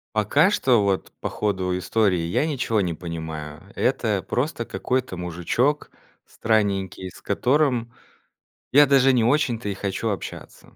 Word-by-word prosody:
Пока 140 Hz, -, +3 dB
что 125 Hz, -, +3 dB
вот 100 Hz, -2 st, -1 dB
по -, -, -2 dB
ходу 95 Hz, -3 st, -1 dB
истории 100 Hz, -2 st, +1 dB
я 85 Hz, -, 0 dB
ничего 130 Hz, -8 st, 0 dB
не 85 Hz, -3 st, -1 dB
понимаю. 80 Hz, -3 st, -7 dB
Это -, -, 0 dB
просто -, -, -1 dB
какой-то 130 Hz, -6 st, -2 dB
мужичок 90 Hz, -, -1 dB, 0.3 s
странненький, 100 Hz, -4 st, -1 dB
с -, -, -16 dB
которым 125 Hz, +1 st, +1 dB, 0.8 s
я 145 Hz, +2 st, +7 dB
даже 135 Hz, -1 st, +5 dB
не 120 Hz, -3 st, +3 dB
очень-то 120 Hz, -4 st, +1 dB
и 100 Hz, -, -3 dB
хочу 100 Hz, +3 st, -2 dB
общаться. 100 Hz, -, -7 dB
105 Hz, 135 wpm, -23 LUFS, 90-130 Hz, 0.8 s, я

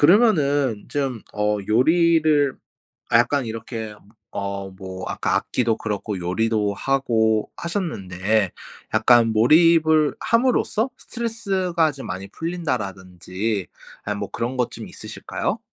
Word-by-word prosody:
그러면은 145 Hz, -, +3 dB
쯤 135 Hz, -6 st, -2 dB
어 105 Hz, 0 st, 0 dB
요리를 155 Hz, +3 st, +3 dB, 0.5 s
아 -, -, +6 dB
약간 140 Hz, -2 st, +2 dB
이렇게 110 Hz, -1 st, -6 dB, 0.4 s
어 100 Hz, -1 st, -4 dB
뭐 95 Hz, 0 st, -8 dB
아까 -, -, -1 dB
악기도 115 Hz, -3 st, 0 dB
그렇고 105 Hz, -2 st, -3 dB
요리도 105 Hz, +3 st, 0 dB
하고 110 Hz, -4 st, +1 dB
하셨는데 105 Hz, -, -1 dB, 0.4 s
약간 115 Hz, -2 st, +5 dB
몰입을 155 Hz, +5 st, +5 dB
함으로써 240 Hz, 0 st, +1 dB
스트레스가 190 Hz, -9 st, -1 dB
좀 135 Hz, -1 st, -9 dB
많이 95 Hz, +2 st, -5 dB
풀린다라든지 100 Hz, -, -3 dB, 0.4 s
아이 105 Hz, -, -2 dB
뭐 100 Hz, -1 st, -5 dB
그런 120 Hz, +3 st, -3 dB
것 125 Hz, -2 st, 0 dB
좀 -, -, -8 dB
있으실까요? -, -, -4 dB
120 Hz, 265 characters per minute, -22 LUFS, 105-160 Hz, 0.5 s, 아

